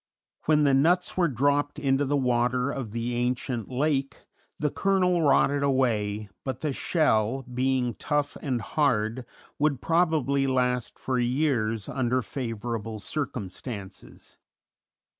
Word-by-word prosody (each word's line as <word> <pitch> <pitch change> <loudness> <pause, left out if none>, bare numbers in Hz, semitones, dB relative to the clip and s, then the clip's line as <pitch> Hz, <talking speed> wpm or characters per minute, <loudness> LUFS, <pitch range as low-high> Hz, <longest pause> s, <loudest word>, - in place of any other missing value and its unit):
When 150 -1 +4
the 140 -2 +4
nuts 170 +7 +3
were 180 -2 +3
dropped 145 +2 +1
into 135 0 +1
the 145 +1 +1
water 125 0 +1
of 130 -6 -4
the 115 +2 -2
ancient 120 -1 -2
lake 135 +1 -1 0.3
the 150 -2 -1
kernel 180 -3 +2
rotted 145 -1 +3
away, 110 -7 +1 0.2
but 130 - -4
the 150 -3 -1
shell, 130 -6 +1
being 125 0 0
tough 145 +4 -1
and 125 -5 -1
hard, 120 -2 0 0.3
would 145 -3 +2
probably 155 -5 +2
last 125 -2 0
for 130 -1 -1
years 120 -4 0
under 130 -1 0
favorable 115 -2 -4
circumstances. 105 -4 -6
130 Hz, 120 wpm, -27 LUFS, 120-145 Hz, 0.3 s, When